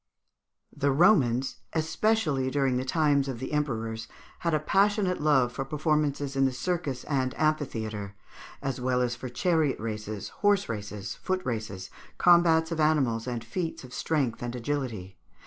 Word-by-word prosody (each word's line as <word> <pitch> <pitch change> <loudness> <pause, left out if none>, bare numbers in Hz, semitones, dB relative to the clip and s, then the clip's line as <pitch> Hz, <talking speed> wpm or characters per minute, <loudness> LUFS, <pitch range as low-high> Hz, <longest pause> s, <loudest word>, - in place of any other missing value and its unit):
The 140 0 +1
Romans, 135 - +3 0.2
especially 160 -3 +1
during 135 -2 +1
the 130 - -1
times 140 0 +2
of 130 -3 -3
the 130 +5 -5
emperors, 115 -6 -2 0.3
had 170 - 0
a - - +2
passionate 195 +2 +2
love 135 -5 +3
for 135 - -3
performances 145 -1 0
in 135 0 +3
the 130 - +2
circus 140 -1 -2
and 130 -3 -1
amphitheatre, 110 -10 -1 0.5
as 135 -2 -2
well 125 0 +1
as 120 -1 -1
for 130 - -7
chariot 155 +2 +1
races, 105 -2 -5
horse 205 -1 +2
races, 105 -2 -5
foot 185 -1 -3
races, 110 -6 -4 0.3
combats 170 -2 +5
of 165 - -2
animals, 135 -7 +2
and 120 -2 -3
feats 165 +8 -4
of 125 0 -11
strength 140 -8 -1
and 120 0 -4
agility. 115 -8 -4
135 Hz, 150 wpm, -28 LUFS, 120-155 Hz, 0.5 s, combats